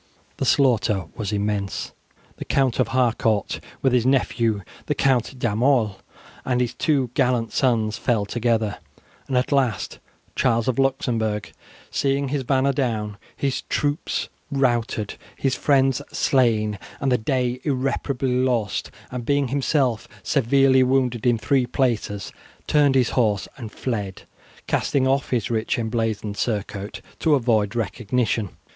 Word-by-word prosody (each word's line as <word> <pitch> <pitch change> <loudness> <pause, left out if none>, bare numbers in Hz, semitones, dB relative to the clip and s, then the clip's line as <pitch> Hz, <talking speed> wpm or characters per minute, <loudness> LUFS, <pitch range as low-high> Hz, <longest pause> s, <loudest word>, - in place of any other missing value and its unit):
The - - -1
slaughter 110 - +3
was 105 -2 -3
immense. 105 -1 -2 0.5
The - - -6
Count 135 -3 +1
of - - +3
Harcourt, 115 -4 +1 0.2
with 135 -2 +3
his 125 -2 +4
nephew 115 -5 +1 0.2
the 150 - 0
Count 130 -1 +1
D'Aumale 120 -2 +2 0.5
and 125 -1 0
his 125 -2 0
two 135 -6 +1
gallant 120 -3 +1
sons, 110 -5 +1
fell 110 -4 +1
together, 115 -1 0 0.5
and 130 - 0
at 125 - 0
last 130 -7 0 0.4
Charles 115 -3 +2
of 130 0 0
Luxembourg, 115 -6 0 0.4
seeing 140 0 0
his 140 -1 -1
banner 135 +2 +2
down, 110 -6 -1 0.2
his 135 -2 -1
troops 145 +1 -1 0.2
routed, 120 -6 0 0.2
his 135 -1 0
friends 135 -1 +2
slain, 110 -6 +2 0.2
and 135 - 0
the 125 - +3
day 125 +1 0
irreparably 135 -1 -1
lost, 125 -5 0 0.2
and 125 -1 -4
being 140 +1 +1
himself 135 -4 +1 0.2
severely 135 0 +4
wounded 125 -2 +1
in 120 -1 +4
three 125 +4 +1
places, 115 -6 -1 0.3
turned 145 -3 +3
his 125 -3 +3
horse 105 -6 +1
and 115 -5 -8
fled, 105 -7 -4 0.4
casting 135 -3 +1
off 135 +1 +1
his 120 -3 -1
rich 110 -1 0
emblazoned 110 -3 -2
surcoat 105 -2 -3 0.2
to 155 -3 +4
avoid 115 -6 +1
recognition. 115 -1 -1
125 Hz, 135 wpm, -23 LUFS, 110-135 Hz, 0.5 s, his